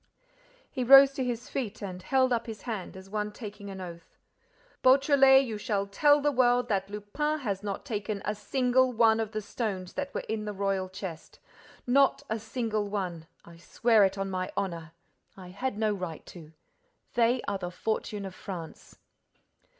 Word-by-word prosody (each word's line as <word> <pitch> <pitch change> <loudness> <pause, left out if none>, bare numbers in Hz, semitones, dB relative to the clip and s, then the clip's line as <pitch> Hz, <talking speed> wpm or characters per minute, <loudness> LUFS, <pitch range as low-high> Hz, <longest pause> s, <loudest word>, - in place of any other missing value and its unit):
He 255 - -2
rose 275 +2 +9
to 275 -1 -3
his 245 -1 -3
feet 220 -6 -4
and 185 -2 -6
held 260 +4 +2
up 235 0 -1
his 220 -3 -8
hand 215 -6 -5
as 190 0 -11
one 210 +1 -3
taking 210 -2 -9
an 190 -1 -7
oath: 170 -2 -10 0.7
"Beautrelet, 270 0 +6
you 220 -4 -5
shall 205 -3 -1
tell 290 +9 +4
the 290 +1 +2
world 245 -2 +3
that 195 -2 0
Lupin 210 +10 -2
has 200 -6 -2
not 200 -2 -5
taken 210 -4 -3
a 210 - 0
single 255 +3 +1
one 225 -1 +4
of 220 -1 -2
the 215 -1 -4
stones 195 -5 -4
that 285 0 -4
were - - -4
in 220 -1 -3
the 210 - -4
royal 195 -1 -1
chest, 185 -3 -8 0.5
not 275 +2 +3
a 220 - 0
single 220 -2 -2
one, 180 -5 -4 0.2
I 170 0 -14
swear 220 +5 +3
it 195 0 +1
on 195 0 -3
my 185 0 -3
honor! 165 -4 -3 0.4
I 185 -2 -10
had 205 +5 -3
no 215 -1 +1
right 180 -5 -6
to. 160 -3 -12 0.6
They 240 +1 +2
are 200 -1 -1
the 175 - -4
fortune 210 +1 -3
of 190 - -7
France." 175 -4 -9
210 Hz, 180 wpm, -28 LUFS, 195-245 Hz, 0.7 s, rose